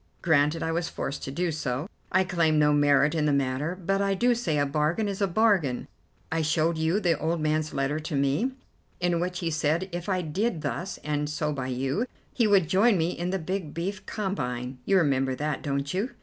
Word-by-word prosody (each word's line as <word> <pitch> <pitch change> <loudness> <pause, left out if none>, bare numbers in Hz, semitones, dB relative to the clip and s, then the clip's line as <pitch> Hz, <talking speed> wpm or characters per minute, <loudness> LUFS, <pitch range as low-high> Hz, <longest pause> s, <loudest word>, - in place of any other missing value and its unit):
Granted 155 0 +3
I 160 - -1
was 165 +1 -1
forced 140 - -4
to - - -5
do 175 +4 -1
so. 145 0 -2 0.2
I 185 +1 +4
claim 170 -4 +2
no 150 0 +4
merit 145 0 +4
in 155 -2 +1
the - - +3
matter, 140 +4 0
but 195 +2 0
I 195 0 +1
do 245 +5 +3
say 195 -11 -1
a 145 - +2
bargain 155 +9 0
is 200 0 -4
a 200 - +3
bargain. 185 - +2 0.4
I 160 0 +1
showed 155 +2 +1
you 160 +5 +1
the 170 -7 +1
old 165 +2 0
man's 155 0 0
letter 135 +2 -1
to 155 -1 -4
me, 140 - +1 0.5
in 175 -1 +1
which 180 +1 -2
he 165 -1 -1
said 160 +4 0
if 175 +2 -5
I 185 -2 +1
did 170 +2 -1
thus 185 +3 -3
and 150 0 -1
so 150 0 -1
by 130 -3 -3
you, 135 - -1 0.3
he 235 -3 +2
would 195 -5 +4
join 200 +4 +4
me 165 +1 +1
in 175 0 -3
the 190 - 0
big 185 -2 -4
beef 190 +4 -3
combine. 125 - -3
You 195 - +4
remember 135 -5 +2
that, 150 0 -2
don't 140 +1 -2
you?" 200 +7 -1
160 Hz, 215 wpm, -27 LUFS, 145-185 Hz, 0.5 s, I